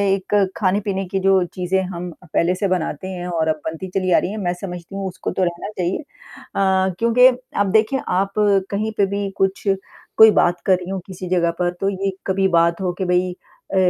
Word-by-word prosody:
एक 195 +1 -7 0.2
खाने-पीने 195 0 0
की 195 - 0
जो 190 -1 +3
चीज़ें 185 +1 0
हम 175 +1 -5
पहले 170 +1 0
से 200 +2 -1
बनाते 185 -2 -2
हैं 180 -2 -5
और 165 -3 -1
अब 155 -1 -1
बनती 160 +3 -4
चली 185 0 -1
आ - - +6
रही 185 - -3
है, 215 - -5
मैं 180 -4 -1
समझती 180 -1 -7
हूँ 195 -1 -3
उसको 185 0 -5
तो 190 - 0
रहना 175 +1 -2
चाहिए। 180 0 -1 0.6
अ, 190 -1 +2
क्योंकि 235 +2 +6 0.3
आप 205 - +3
देखिए 220 +6 +2
आप 195 +2 0 0.4
कहीं 215 +2 -1
पे 200 - +4
भी 200 0 -2
कुछ 195 0 0 0.5
कोई 220 0 +9
बात 175 -3 +2
कर 190 - +5
रही 180 0 -8
हो 190 0 -2
किसी 185 -1 -7
जगह 170 -2 +2
पर 175 -1 +1
तो 195 - +2
ये 195 0 -2 0.2
कभी 190 0 +2
बात 170 0 +2
हो 185 -1 0
कि - - +1
भई 180 0 +1
अ, 180 - -12
190 Hz, 210 wpm, -20 LUFS, 180-195 Hz, 0.6 s, कोई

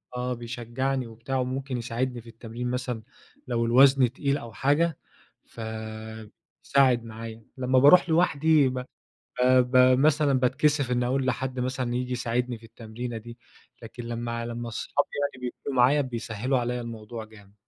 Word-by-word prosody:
آه، 125 0 -2
بيشجعني 120 +2 -3
وبتاع 115 +4 -4
وممكن 130 +1 -2
يساعدني 120 +1 -3
في 115 - -14
التمرين 115 +2 -6
مثلًا 125 -3 -3 0.4
لو 115 -1 0
الوزن 130 +1 +5
تقيل 140 +1 0
أو 115 -5 -9
حاجة، 145 +5 +1 0.5
ف - - -26 1.1
ساعد 130 -4 +3
معايا، 115 0 -9
لمّا 130 0 +3
باروح 175 +6 +7
لوحدي 160 -3 +4
ب 130 - -5
ب 125 - -8 0.8
ب 130 0 +6
مثلًا 150 0 +3
باتكسف 135 +1 +2
إني 125 0 +1
أقول 130 +1 0
لحد 130 0 -2
مثلًا 125 -1 -2
ييجي 125 0 -2
يساعدني 120 0 -1
في 115 - -19
التمرينة 115 +1 -7
دي، 120 +2 -11 0.4
لكن 115 +1 -9
لمّا 115 0 -4
لمّا 120 0 -5
صحابي 145 +5 -1 0.3
يعني 125 -1 -6
بيكونوا 130 +2 -5
معايا 135 +4 +5
بيسهّلوا 120 0 -2
عليّا 125 0 -2
الموضوع 115 -1 -7
جامد. 105 -2 -17
125 Hz, 150 wpm, -26 LUFS, 115-130 Hz, 1.1 s, باروح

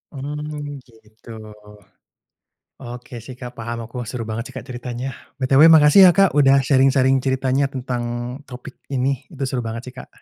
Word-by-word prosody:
Mmm, 145 0 -6 0.2
gitu. 110 +2 -20 1.5
Oke 120 0 -10
sih 130 - -10
Kak, 125 -1 -7
paham 115 0 -5
aku 120 +2 -6
seru 125 -2 -5
banget 110 +1 -3
sih - - -13
Kak, - - -8
ceritanya. 125 0 -5 0.3
BTW 135 +2 +4
makasih 155 +4 +7
ya - - +6
Kak, 195 -1 +5
udah 140 -1 +5
sharing-sharing 135 -1 +3
ceritanya 130 +1 0
tentang 125 -2 -3 0.5
topik 130 +1 -10 0.2
ini. 135 0 -1
Itu 140 -4 -6
seru 130 -1 -2
banget 115 0 -5
sih - - -16
Kak. - - -10
130 Hz, 160 wpm, -20 LUFS, 125-140 Hz, 1.5 s, makasih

